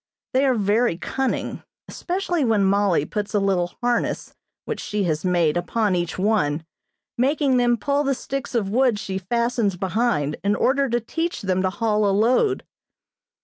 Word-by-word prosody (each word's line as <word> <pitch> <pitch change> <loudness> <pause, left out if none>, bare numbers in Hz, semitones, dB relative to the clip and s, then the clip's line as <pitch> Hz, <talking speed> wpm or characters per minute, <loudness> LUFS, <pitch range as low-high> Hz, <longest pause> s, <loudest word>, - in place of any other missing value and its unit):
They 265 +2 +3
are 260 - +3
very 210 -2 +1
cunning, 265 +8 -2 0.3
especially 355 -3 -2
when 220 -5 +2
Mollie 195 -5 +2
puts 210 +3 -4
a - - +4
little 185 -3 0
harness 240 -1 -1 0.3
which - - -4
she 210 -1 -2
has 155 -4 -1
made 175 -4 +2
upon 195 +3 0
each 175 -1 -2
one, 170 -7 +1 0.5
making 275 0 +2
them 240 -1 +3
pull 285 +5 0
the 275 -1 +1
sticks 265 -1 -5
of 200 -4 0
wood 250 -1 +3
she 190 -2 -4
fastens 235 0 0
behind 190 -6 0
in 200 +1 +2
order 275 +3 +2
to 240 +1 +1
teach 325 +8 -3
them 185 -1 +1
to 185 - +1
haul 210 0 +1
a - - +2
load. 250 - +2
215 Hz, 165 wpm, -23 LUFS, 190-250 Hz, 0.5 s, a